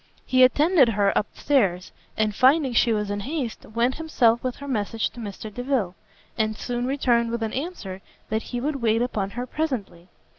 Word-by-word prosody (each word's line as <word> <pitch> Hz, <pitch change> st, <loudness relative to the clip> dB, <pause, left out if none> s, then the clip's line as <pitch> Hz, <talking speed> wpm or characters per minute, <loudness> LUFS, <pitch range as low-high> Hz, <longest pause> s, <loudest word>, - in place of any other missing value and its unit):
He 255 Hz, 0 st, +3 dB
attended 290 Hz, +1 st, +5 dB
her 200 Hz, -2 st, +1 dB
up 210 Hz, -, +1 dB
stairs; 195 Hz, -11 st, +1 dB, 0.3 s
and 215 Hz, -1 st, +1 dB
finding 265 Hz, +3 st, +4 dB
she 235 Hz, 0 st, +3 dB
was 210 Hz, -2 st, -1 dB
in 205 Hz, -, -2 dB
haste, 260 Hz, +1 st, -4 dB
went 235 Hz, +4 st, 0 dB
himself 245 Hz, -8 st, +2 dB
with 255 Hz, -1 st, -2 dB
her 280 Hz, -, -9 dB
message 225 Hz, -3 st, -1 dB
to 240 Hz, -, -12 dB
Mr 210 Hz, 0 st, -7 dB
Delvile: 245 Hz, -7 st, -1 dB, 0.5 s
and 215 Hz, 0 st, 0 dB
soon 245 Hz, 0 st, -3 dB
returned 240 Hz, -4 st, +2 dB
with 235 Hz, 0 st, -2 dB
an 220 Hz, -, -3 dB
answer 255 Hz, -, -5 dB, 0.3 s
that 220 Hz, +1 st, 0 dB
he 245 Hz, -, -3 dB
would 285 Hz, +3 st, -2 dB
wait 225 Hz, 0 st, +2 dB
upon 205 Hz, -6 st, -2 dB
her 245 Hz, -, -2 dB
presently. 225 Hz, -, -4 dB
235 Hz, 185 wpm, -24 LUFS, 215-265 Hz, 0.5 s, attended